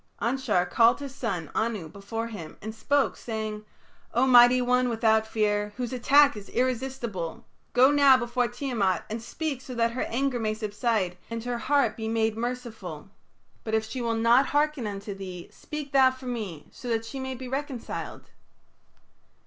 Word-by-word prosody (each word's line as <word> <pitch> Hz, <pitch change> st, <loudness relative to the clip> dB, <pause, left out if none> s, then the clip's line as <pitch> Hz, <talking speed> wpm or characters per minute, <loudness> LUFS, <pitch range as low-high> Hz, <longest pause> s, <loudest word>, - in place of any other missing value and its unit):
" -, -, -32 dB
Anshar 240 Hz, -9 st, +1 dB
called 235 Hz, +2 st, +4 dB
his 280 Hz, -2 st, -7 dB
son, 195 Hz, -, -3 dB
Anu, 220 Hz, -7 st, -1 dB
before 200 Hz, +6 st, -5 dB
him, 170 Hz, -8 st, -8 dB
and 220 Hz, +1 st, -6 dB
spoke, 280 Hz, +5 st, +1 dB
saying: 215 Hz, -2 st, -5 dB, 0.5 s
"O 245 Hz, +3 st, +4 dB
mighty 245 Hz, -1 st, +7 dB
one 250 Hz, 0 st, +2 dB
without 220 Hz, -1 st, +2 dB
fear, 210 Hz, -1 st, 0 dB
whose 250 Hz, 0 st, -3 dB
attack 280 Hz, +3 st, +5 dB
is 205 Hz, -1 st, -9 dB
irresistible, 245 Hz, -8 st, -2 dB, 0.3 s
go 255 Hz, +3 st, +6 dB
now 280 Hz, -2 st, +6 dB
before 240 Hz, 0 st, 0 dB
Tiamat 235 Hz, -7 st, -1 dB
and 225 Hz, +1 st, -3 dB
speak 280 Hz, +3 st, -4 dB
so 255 Hz, -1 st, -8 dB
that 230 Hz, 0 st, +2 dB
her 250 Hz, -, -3 dB
anger 260 Hz, +1 st, -1 dB
may 215 Hz, -1 st, -1 dB
subside 210 Hz, -3 st, -1 dB
and 230 Hz, -1 st, -4 dB
her 245 Hz, -1 st, -3 dB
heart 280 Hz, +4 st, +2 dB
be 220 Hz, -2 st, -4 dB
made 225 Hz, -1 st, +1 dB
merciful. 240 Hz, 0 st, -5 dB, 0.5 s
But 220 Hz, -1 st, -1 dB
if 220 Hz, 0 st, 0 dB
she 250 Hz, +3 st, -5 dB
will 230 Hz, -1 st, 0 dB
not 235 Hz, +4 st, +4 dB
hearken 295 Hz, -5 st, +1 dB
unto 200 Hz, 0 st, -5 dB
thee, 185 Hz, -3 st, -8 dB
speak 300 Hz, -2 st, -7 dB
thou 265 Hz, -2 st, +6 dB
for 260 Hz, 0 st, -10 dB
me, 215 Hz, -11 st, -5 dB
so 250 Hz, -, -10 dB
that 225 Hz, -1 st, 0 dB
she 265 Hz, +4 st, -6 dB
may 260 Hz, 0 st, -4 dB
be 255 Hz, +1 st, -7 dB
reconciled." 270 Hz, -2 st, -5 dB
235 Hz, 175 wpm, -27 LUFS, 220-260 Hz, 0.5 s, mighty